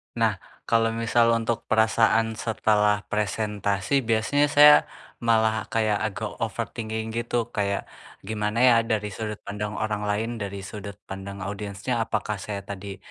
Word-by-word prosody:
Nah, -, -, +1 dB, 0.2 s
kalau 115 Hz, -1 st, +2 dB
misal 115 Hz, +1 st, +3 dB
untuk 115 Hz, 0 st, -2 dB
perasaan 110 Hz, 0 st, +3 dB
setelah 105 Hz, -2 st, +2 dB
presentasi 105 Hz, +3 st, 0 dB
biasanya 115 Hz, +5 st, +2 dB
saya 150 Hz, 0 st, +8 dB, 0.4 s
malah 110 Hz, -3 st, +2 dB
kayak 110 Hz, -2 st, +1 dB
agak 105 Hz, +1 st, -5 dB
overthinking 110 Hz, 0 st, -3 dB
gitu, 120 Hz, 0 st, -2 dB
kayak 100 Hz, -2 st, -1 dB, 0.4 s
gimana 105 Hz, +1 st, -2 dB
ya 125 Hz, -2 st, +7 dB, 0.2 s
dari 105 Hz, -1 st, -1 dB
sudut 105 Hz, +1 st, -4 dB
pandang 105 Hz, +1 st, -4 dB
orang 105 Hz, -1 st, -2 dB
lain, 105 Hz, +3 st, 0 dB
dari 100 Hz, -1 st, -5 dB
sudut 100 Hz, 0 st, -7 dB
pandang 95 Hz, 0 st, -7 dB
audiensnya. 100 Hz, +4 st, -3 dB
Apakah 110 Hz, -2 st, -2 dB
saya 100 Hz, 0 st, -5 dB
tadi 100 Hz, -1 st, -7 dB
110 Hz, 135 wpm, -25 LUFS, 105-115 Hz, 0.4 s, saya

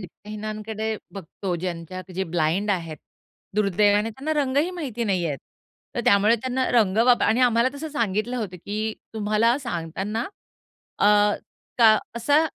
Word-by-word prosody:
नेत्रहीनांकडे 215 Hz, +2 st, -5 dB, 0.2 s
बघतो 190 Hz, 0 st, -5 dB
ज्यांच्या 180 Hz, 0 st, -5 dB
जे 190 Hz, -, -1 dB
ब्लाइंड 175 Hz, +4 st, 0 dB
आहेत, 165 Hz, -5 st, -2 dB, 0.6 s
दुर्दैवाने 205 Hz, +1 st, +3 dB
त्यांना 275 Hz, +7 st, -3 dB
रंगही 285 Hz, +6 st, +1 dB
माहिती 265 Hz, -10 st, -4 dB
नाहीयेत. 175 Hz, -8 st, 0 dB, 0.6 s
तर -, -, 0 dB
त्यामुळे 205 Hz, +3 st, +5 dB
त्यांना 255 Hz, +2 st, -1 dB
रंग 215 Hz, -5 st, +3 dB
वाप 245 Hz, -1 st, +5 dB
आणि 230 Hz, +3 st, +3 dB
आम्हाला 240 Hz, 0 st, +4 dB
तसं 305 Hz, +3 st, -5 dB
सांगितलं 230 Hz, -4 st, -1 dB
होतं, 200 Hz, -6 st, -4 dB
की 215 Hz, +4 st, -3 dB, 0.2 s
तुम्हाला 220 Hz, +3 st, +2 dB
सांगताना 205 Hz, -, -3 dB, 0.7 s
अ, -, -, +2 dB, 0.7 s
का 220 Hz, -2 st, +7 dB, 0.2 s
असा 290 Hz, +7 st, +3 dB
215 Hz, 130 wpm, -24 LUFS, 190-240 Hz, 0.7 s, का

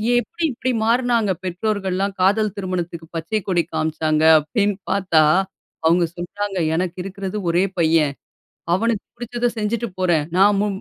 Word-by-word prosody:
எப்டி 330 Hz, +9 st, -2 dB
இப்டி 255 Hz, +1 st, -2 dB
மாற்னாங்க 235 Hz, -2 st, +2 dB
பெற்றோர்கள்லாம் 195 Hz, +1 st, -1 dB
காதல் 205 Hz, +2 st, +2 dB
திருமணத்துக்கு 175 Hz, -4 st, -4 dB
பச்சை 165 Hz, +7 st, -1 dB
கொடி 175 Hz, -3 st, +2 dB
காண்பிச்சாங்க, 155 Hz, 0 st, 0 dB, 0.2 s
அப்டின்னு 200 Hz, +6 st, -1 dB
பார்த்தா 185 Hz, -5 st, +3 dB, 0.6 s
அவங்க 170 Hz, +2 st, +4 dB
சொன்னாங்க 195 Hz, +2 st, -4 dB, 0.2 s
எனக்கு 180 Hz, +1 st, -2 dB
இருக்கிறது 195 Hz, +1 st, -5 dB
1ரே 175 Hz, +2 st, +3 dB
பையன். 160 Hz, -3 st, +3 dB, 0.6 s
அவனுக்கு 220 Hz, +3 st, 0 dB
புடிச்சத 240 Hz, 0 st, -2 dB
செஞ்சிட்டு 220 Hz, +2 st, -1 dB
போறேன். 175 Hz, -5 st, +2 dB
நான் 200 Hz, +2 st, +5 dB
மு 210 Hz, -, +1 dB
190 Hz, 130 wpm, -21 LUFS, 170-215 Hz, 0.6 s, நான்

